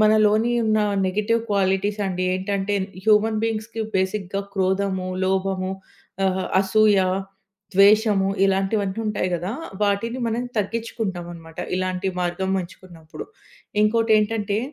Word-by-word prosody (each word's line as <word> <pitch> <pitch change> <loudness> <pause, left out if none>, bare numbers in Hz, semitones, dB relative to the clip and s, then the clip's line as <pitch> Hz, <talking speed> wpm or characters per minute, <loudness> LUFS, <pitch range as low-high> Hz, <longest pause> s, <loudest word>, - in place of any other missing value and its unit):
మనలోని 215 +2 +4
ఉన్న 215 0 +2 0.3
negative 210 +4 +1
qualities 200 +1 +1
అండి. 185 -1 -2
ఏంటంటే, 195 +2 -1 0.3
హ్యూమన్ 215 0 +4
బీయింగ్స్‌కి 225 0 -3 0.2
బేసిక్‍గా 190 0 -1
క్రోధము, 190 -1 0 0.2
లోభము, 190 0 0 0.5
ఆహ్, 190 0 0
అసూయ, 205 +1 +4 0.7
ద్వేషము, 200 0 +5 0.2
ఇలాంటివన్నీ 195 +1 0
ఉంటాయి 205 -3 -1
గదా! 175 +4 -3 0.3
వాటిని 210 +5 0
మనం 230 +2 -1
తగ్గించుకుంటామనమాట 190 -7 -4 0.2
ఇలాంటి 185 +1 -1
మార్గం 180 +2 -1
ఎంచుకున్నప్పుడు. 170 -3 -11 0.6
ఇంకోటేంటంటే, 215 -1 +2
200 Hz, 100 wpm, -23 LUFS, 190-215 Hz, 0.7 s, ద్వేషము